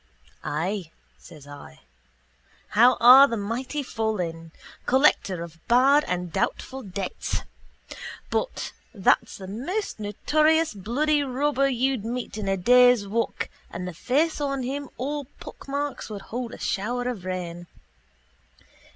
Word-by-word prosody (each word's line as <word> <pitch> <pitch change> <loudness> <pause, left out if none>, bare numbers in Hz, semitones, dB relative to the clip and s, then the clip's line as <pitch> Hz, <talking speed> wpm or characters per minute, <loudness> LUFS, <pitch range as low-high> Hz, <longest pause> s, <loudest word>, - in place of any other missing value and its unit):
—Ay, 175 +4 -2 0.3
says 155 -5 -14
I. 145 - -12 0.9
How 240 +4 +5
are 260 +4 +9
the 230 - -3
mighty 250 +8 -3
fallen! 180 -9 -3 0.4
Collector 245 - +3
of 170 -1 -11
bad 270 +5 +5
and 180 -1 -3
doubtful 265 0 -2
debts. 195 -3 -4 0.9
But - - -2 0.2
that's 195 - +2
the 190 - -9
most 285 - -4
notorious 310 +10 +2
bloody 280 +10 0
robber 275 +1 +1
you'd 260 -2 0
meet 240 +1 -4
in 210 -2 -4
a 195 0 +1
day's 245 +1 +5
walk 230 +3 -1 0.2
and 180 +1 -6
the 180 - -5
face 295 - 0
on 275 -2 -1
him 275 +2 -4
all 285 +2 -3
pockmarks 280 -1 -5
would 205 -2 -7
hold 245 -1 -3
a - - -14
shower 245 +5 -2
of 235 -7 -4
rain. 175 -2 -5
240 Hz, 125 wpm, -25 LUFS, 190-275 Hz, 0.9 s, are